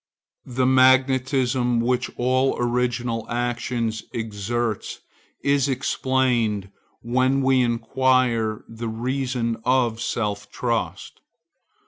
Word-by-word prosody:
The 130 0 0
magnetism 130 -1 +3
which 125 +1 0
all 130 +2 +1
original 120 -1 -1
action 120 -1 -1 0.2
exerts 110 0 -3 0.4
is 140 -1 +2
explained 125 -6 0 0.3
when 130 +3 +1
we 130 -1 +4
inquire 120 -1 +1
the 115 0 -6
reason 125 0 -2
of 120 -3 +1
self 105 -3 -2
trust. 120 -3 -3
120 Hz, 85 wpm, -23 LUFS, 115-130 Hz, 0.4 s, we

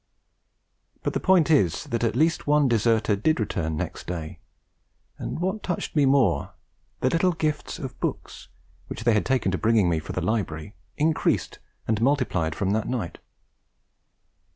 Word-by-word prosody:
But - - -1
the - - 0
point 180 -4 +4
is 95 - +3
that 120 -6 -3
at 115 -2 +1
least 160 +4 +1
one 145 -1 +4
deserter 115 -2 +2
did 140 +10 +1
return 80 -7 -2
next - - -5
day; 80 -3 -5 0.8
and - - -4
what 190 +5 -2
touched 180 - -3
me 145 -3 +4
more, 130 -9 +2 0.5
the 130 - +3
little 180 +2 +2
gifts 155 -2 -2
of 135 -7 -7
books, - - -4 0.4
which - - -6
they 120 -1 +4
had 105 - +1
taken 130 -7 +1
to 95 - -1
bringing 110 -4 +3
me 80 -2 +1
for 80 - -7
the - - -1
library, 100 -4 -2 0.2
increased 155 +1 0 0.3
and 110 -1 0
multiplied 115 - +1
from 95 +4 -1
that 110 +1 0
night. 115 -10 -3
115 Hz, 160 wpm, -25 LUFS, 100-150 Hz, 0.8 s, point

